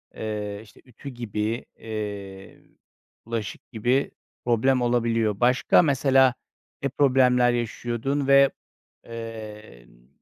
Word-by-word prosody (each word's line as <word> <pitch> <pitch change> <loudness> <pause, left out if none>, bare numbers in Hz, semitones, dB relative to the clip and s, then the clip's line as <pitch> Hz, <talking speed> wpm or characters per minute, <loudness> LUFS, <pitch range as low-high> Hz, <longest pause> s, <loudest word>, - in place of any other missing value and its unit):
ııı, 105 -1 -4
işte, 110 - -18
ütü 130 +2 -10
gibi, 115 -2 -3
ııı, 100 -3 -7 0.5
bulaşık 115 -3 -5
gibi 120 +5 0 0.3
problem 125 +2 +2
olabiliyor. 115 -3 +1
Başka 125 +1 +4
mesela 135 -4 +3 0.5
ne 140 - +1
problemler 125 -3 +3
yaşıyordun 120 +4 -2
ve, 140 0 +6 0.5
emm 105 - -10
115 Hz, 95 wpm, -25 LUFS, 105-130 Hz, 0.5 s, ve